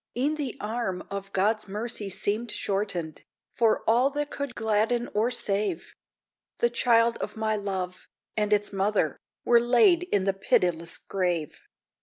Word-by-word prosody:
E'en 280 +5 +2
the 290 -6 -3
arm 210 -4 -3
of 195 0 -5
God's 210 +3 +1
mercy 210 0 -4
seemed 215 +5 -2
shortened, 195 -7 -2 0.3
For 230 -2 +2
all 240 +5 +4
that 290 +1 -3
could 280 -4 -4
gladden 225 +2 +1
or 220 +3 +2
save; 200 -6 -1 0.6
The 235 - +2
child 235 -1 +3
of - - -5
my 220 0 0
love, 190 -3 -4 0.3
and 210 -1 0
its 205 0 +1
mother, 200 +2 0 0.3
Were 235 -1 +5
laid 245 +9 +5
in 200 - +2
the 195 0 +1
pitiless 175 -3 +1
grave! 175 -5 -2
215 Hz, 145 wpm, -27 LUFS, 195-235 Hz, 0.6 s, Were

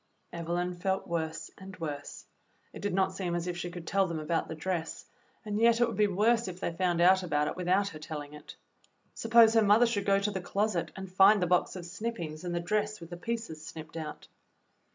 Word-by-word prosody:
Evelyn 175 +1 -2
felt 190 +2 -1
worse 160 -1 -3
and 190 0 -10
worse. 145 -3 -6 0.5
It - - -9
did 205 - -1
not 190 0 +2
seem 180 -3 -2
as 175 0 -2
if 180 -1 -3
she 175 0 -4
could 175 -1 -8
tell 195 +1 +2
them 165 -2 -3
about 155 +2 -1
the 160 - -6
dress, 165 0 -3 0.4
and 210 0 -2
yet 230 0 +5
it 240 - +4
would - - -4
be 210 -1 +3
worse 220 +4 +2
if 180 -1 -6
they - - -2
found 175 0 0
out 185 +2 +6
about 150 -4 0
it - - -3
without 185 +3 +1
her 155 - -10
tell 155 -1 -5
ing 145 0 -11
it. 150 0 -11 0.6
Suppose 225 0 +5
her 225 - +5
mother 210 +3 +5
should 210 -4 -1
go 195 0 +5
to 200 +1 0
the 190 -2 -3
closet 200 -1 -1
and 190 -1 -8
find 195 +3 +7
the 180 - +1
box 180 +2 +1
of 180 -2 -7
snippings 175 -5 -5
and 175 -1 -3
the - - 0
dress 210 +4 -1
with 165 0 -11
the - - -4
pieces 225 -5 -5
snipped 160 0 -9
out. 155 -2 -6
180 Hz, 230 wpm, -30 LUFS, 165-205 Hz, 0.6 s, find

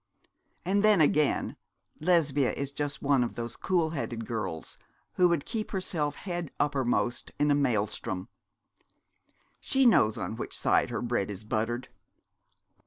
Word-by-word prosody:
And 200 +3 +2
then 215 -2 +5
again, 150 -1 +2 0.4
Lesbia 155 -6 +2
is 140 0 -3
just 145 0 -4
one 140 -3 +3
of 120 - -4
those 120 0 -5
cool 170 -4 0
headed 120 -7 -4
girls 95 -9 -4 0.4
who 180 -1 +4
would 170 -5 0
keep 225 -2 -3
herself 160 -6 -1
head 175 -5 -4
uppermost 130 -4 0
in 145 0 +2
a - - +6
maelstrom. 105 -8 0 1.3
She 270 0 +2
knows 110 - +5
on 110 - -4
which - - -4
side - - +2
her 120 -1 -3
bread 120 -5 -1
is 100 +1 -6
buttered. 115 +3 -2
140 Hz, 140 wpm, -29 LUFS, 120-170 Hz, 1.3 s, a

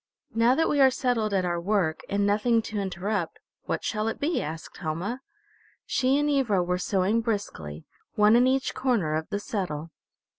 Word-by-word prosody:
"Now 230 +3 +4
that 325 - +2
we 285 - +2
are 265 - +8
settled 245 -4 0
at 190 -2 +1
our 175 -1 -1
work, 180 -4 0
and 200 0 +1
nothing 220 +3 +2
to 215 -1 -4
interrupt, 190 -1 -2 0.3
what - - -2
shall 215 0 -1
it 225 - -3
be?" 315 +4 0
asked 160 +2 -7
Helma. 175 +11 -3 0.6
She 265 +1 +2
and 295 0 +1
Ivra 250 -10 +2
were 180 +1 -1
sewing 195 +4 +1
briskly, 80 - -4 0.3
one 210 +1 +5
in 245 +2 +5
each 265 +1 +1
corner 235 - 0
of 155 0 -2
the 205 - -2
settle. 165 -7 -4
210 Hz, 180 wpm, -26 LUFS, 180-245 Hz, 0.6 s, are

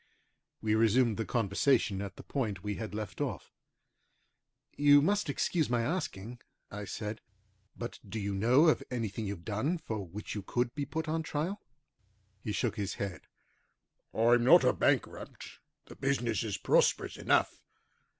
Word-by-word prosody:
We 110 -1 +2
resumed 115 +1 +3
the 115 - -2
conversation 110 -1 +1
at 100 -2 -6
the - - -11
point 105 -9 -3
we 105 0 -2
had 110 -2 -5
left 105 -5 -5
off. - - -4 1.2
"You 145 0 +6
must 200 +3 +1
excuse 155 +2 0
my 120 -1 +1
asking," 125 - -3 0.3
I 105 0 -6
said, 105 +3 -5 0.6
"but 120 - -6
do 110 - -4
you 100 -1 -2
know 120 +10 +4
of - - +2
anything 110 -3 -3
you've 100 -4 -6
done 125 - -1
for 110 -10 -5
which 95 +4 -7
you 105 - -4
could 120 +4 -1
be 145 -2 -3
put 160 +1 -4
on 160 +1 0
trial?" 160 +6 -3 0.8
He 105 - -3
shook - - -1
his 100 -2 -3
head. 95 -5 -5 0.8
"I'm 120 +1 +4
not 125 - +7
a - - +4
bankrupt, - - -1 0.3
the - - -12
business 125 -5 0
is 105 -3 -2
prosperous - - +2
enough. - - +1
115 Hz, 155 wpm, -31 LUFS, 105-140 Hz, 1.2 s, not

